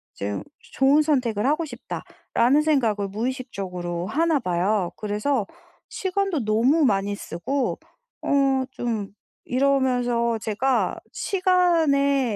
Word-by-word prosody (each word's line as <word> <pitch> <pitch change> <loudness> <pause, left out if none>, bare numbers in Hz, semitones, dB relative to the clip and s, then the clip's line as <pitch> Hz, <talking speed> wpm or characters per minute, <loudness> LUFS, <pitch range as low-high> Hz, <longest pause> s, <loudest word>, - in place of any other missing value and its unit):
좀 100 +1 -4 0.3
좋은 275 +3 +4
선택을 250 -8 +1
하고 310 +4 +1
싶다.'라는 250 +1 -1
생각을 230 -10 +1
무의식적으로 195 -7 -4
하나 315 +6 +2
봐요. 185 -1 0
그래서 210 +3 -1 0.4
시간도 380 - -1
너무 250 +9 +3
많이 200 -3 +1
쓰고 255 - -3 0.4
어 275 -2 +2
좀 225 -6 -3 0.4
이러면서 250 -3 +1
제가 225 +5 0
시간에 320 - +2
255 Hz, 235 characters per minute, -24 LUFS, 210-285 Hz, 0.4 s, 좋은